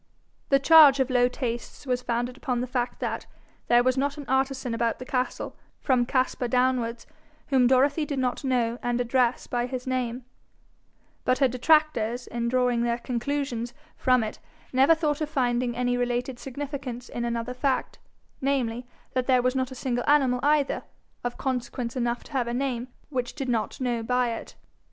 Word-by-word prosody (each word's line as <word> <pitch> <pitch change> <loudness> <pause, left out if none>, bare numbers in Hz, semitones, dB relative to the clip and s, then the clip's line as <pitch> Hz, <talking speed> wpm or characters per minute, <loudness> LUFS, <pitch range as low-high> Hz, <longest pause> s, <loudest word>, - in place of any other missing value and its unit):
The 275 - +6
charge 285 -1 +8
of 265 0 +1
low 245 -1 +4
tastes 240 0 -5
was 250 -2 0
founded 245 +1 -2
upon 255 -2 -2
the 250 - -1
fact 245 -1 -2
that - - -3 0.4
there 240 0 +5
was 255 +1 +2
not 285 +2 -1
an 290 - -7
artisan 265 -1 0
about 230 0 0
the 255 - -8
castle, 255 0 -2 0.2
from 250 -4 +2
Caspar 255 -1 0
downwards, 250 -2 +1 0.4
whom 260 -3 +4
Dorothy 280 +4 +3
did 285 -2 -3
not 255 0 -1
know 245 -3 0
and 245 0 -1
address 245 0 +1
by 245 0 -1
his 255 -1 -5
name; 250 -1 -2 1.0
but 255 - +2
her 270 - +4
detractors, 250 -3 +2
in 235 0 -2
drawing 250 -1 +2
their 235 0 +1
conclusions 245 -1 -3 0.2
from 255 -3 +3
it, 215 - -5 0.3
never 270 +5 +6
thought 305 -1 -1
of 305 - -1
finding 245 -4 0
any 245 0 +1
related 245 +1 -1
significance 270 -2 -6
in 240 - -4
another 235 +1 -2
fact, 260 +1 -1 0.4
namely, 250 -3 -1 0.3
that 255 -1 0
there 255 -2 +4
was 255 +1 +1
not 260 -1 0
a 260 - -9
single 245 -1 -2
animal 265 -4 +4
either, 290 -1 +2 0.4
of 245 0 -3
consequence 250 -2 -3
enough 240 -1 -1
to - - -16
have 255 -4 0
a 235 - -2
name, 250 -2 -2 0.2
which 250 -4 -3
did 270 -3 -3
not 220 -4 -1
know 245 -3 -1
by 250 +1 +1
it. 230 - -7
250 Hz, 175 wpm, -26 LUFS, 240-265 Hz, 1.0 s, charge